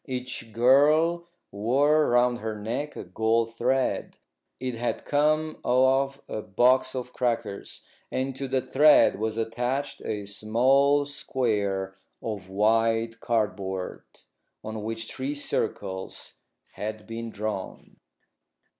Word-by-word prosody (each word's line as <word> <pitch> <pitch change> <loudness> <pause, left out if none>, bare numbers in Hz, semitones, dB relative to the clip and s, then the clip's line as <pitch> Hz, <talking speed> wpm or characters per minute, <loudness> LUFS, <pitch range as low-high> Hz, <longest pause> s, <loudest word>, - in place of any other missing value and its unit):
Each 125 -3 -5
girl 150 +9 +4 0.2
wore 140 +9 +3
round 120 0 +3
her 110 -1 -4
neck 125 +8 -3
a - - -6
gold 110 +4 0
thread 130 +3 0 0.4
it 130 -1 -3
had 120 +1 -3
come 155 +2 +1
off 135 +2 +2
a 110 - -4
box 125 +6 +2
of 125 -1 -5
crackers 115 -5 -3 0.3
and 130 0 -2
to 135 0 -4
the 130 0 0
thread 150 -7 +5
was 110 0 -2
attached 120 +5 -2
a 105 -2 -3
small 130 +8 +3
square 105 -9 -1 0.3
of 105 -4 -5
white 115 +3 +1
cardboard, 100 -5 -2 0.6
on 110 0 -5
which 115 +1 -4
three 135 +2 -3
circles 95 -8 -4 0.4
had 110 0 -5
been 115 0 -6
drawn. 105 -3 -6
120 Hz, 115 wpm, -26 LUFS, 110-135 Hz, 0.6 s, thread